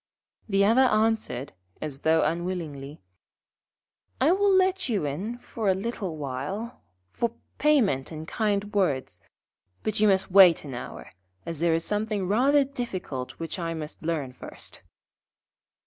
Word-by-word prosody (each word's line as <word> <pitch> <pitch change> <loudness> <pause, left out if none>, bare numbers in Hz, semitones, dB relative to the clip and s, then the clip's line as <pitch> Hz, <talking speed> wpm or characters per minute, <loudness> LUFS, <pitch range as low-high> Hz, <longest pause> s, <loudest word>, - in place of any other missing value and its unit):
The 200 0 +3
other 230 +5 +5
answered, 215 - 0 0.3
as 150 -2 -5
though 160 0 +3
unwillingly: 160 - -3 1.2
'I 275 +5 +4
will 400 +2 +3
let 375 -4 +2
you 205 -9 0
in 195 +12 -3
for 225 -3 -3
a 190 - +4
little 195 -5 -4
while 150 - -5 0.3
for 235 -1 -2 0.2
payment 230 - +2
and 155 0 -7
kind 205 -1 -1
words, 140 - 0 0.6
but 215 -1 -1
you 215 - +5
must 190 -1 +2
wait 180 -5 +7
an 135 - -7
hour, 90 - -8 0.3
as 165 -3 -5
there 165 0 +3
is 165 - -2
something 210 -2 -1
rather 270 +8 +4
difficult 185 - -5
which 165 +3 -6
I 165 -1 -2
must 155 -1 -7
learn 155 -6 -2
first.' - - -10
190 Hz, 140 wpm, -26 LUFS, 155-225 Hz, 1.2 s, wait